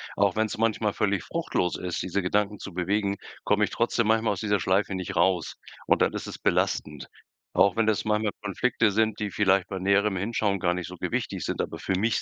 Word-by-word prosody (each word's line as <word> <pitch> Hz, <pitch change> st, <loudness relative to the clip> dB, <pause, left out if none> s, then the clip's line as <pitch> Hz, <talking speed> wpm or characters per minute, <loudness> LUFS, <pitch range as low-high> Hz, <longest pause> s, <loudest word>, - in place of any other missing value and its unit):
auch 100 Hz, -1 st, +2 dB
wenn's 110 Hz, -1 st, 0 dB
manchmal 110 Hz, -2 st, +1 dB
völlig 100 Hz, -3 st, 0 dB
fruchtlos 165 Hz, -, -1 dB
ist, 90 Hz, -2 st, -3 dB
diese 95 Hz, +2 st, -1 dB
Gedanken 105 Hz, +3 st, 0 dB
zu 100 Hz, -, -8 dB
bewegen, 100 Hz, +3 st, 0 dB, 0.3 s
komme 105 Hz, +1 st, +2 dB
ich -, -, 0 dB
trotzdem 115 Hz, -1 st, +1 dB
manchmal 110 Hz, 0 st, +2 dB
aus 95 Hz, -, -6 dB
dieser 105 Hz, -2 st, +1 dB
Schleife 95 Hz, +3 st, +1 dB
nicht 95 Hz, -1 st, -4 dB
raus 90 Hz, -1 st, +1 dB, 0.3 s
und -, -, +3 dB
dann -, -, +1 dB
ist -, -, -5 dB
es -, -, -7 dB
belastend. 75 Hz, -3 st, -1 dB, 0.5 s
Auch 100 Hz, -2 st, +4 dB
wenn 110 Hz, -1 st, +2 dB
es 110 Hz, -, 0 dB
manchmal 105 Hz, -1 st, +1 dB
Konflikte 110 Hz, +2 st, +1 dB
sind, 110 Hz, +1 st, +1 dB
die 105 Hz, -2 st, -2 dB
vielleicht 95 Hz, -2 st, +2 dB
bei 95 Hz, -, -5 dB
näherem 100 Hz, +2 st, +2 dB
Hinschauen 100 Hz, 0 st, 0 dB
gar 90 Hz, -2 st, +1 dB
nicht 90 Hz, -1 st, -4 dB
so 90 Hz, -, -9 dB
gewichtig -, -, -3 dB
sind, -, -, -3 dB
aber -, -, -6 dB
für 95 Hz, -, -1 dB
mich 110 Hz, +3 st, +1 dB
100 Hz, 210 wpm, -26 LUFS, 95-110 Hz, 0.5 s, Auch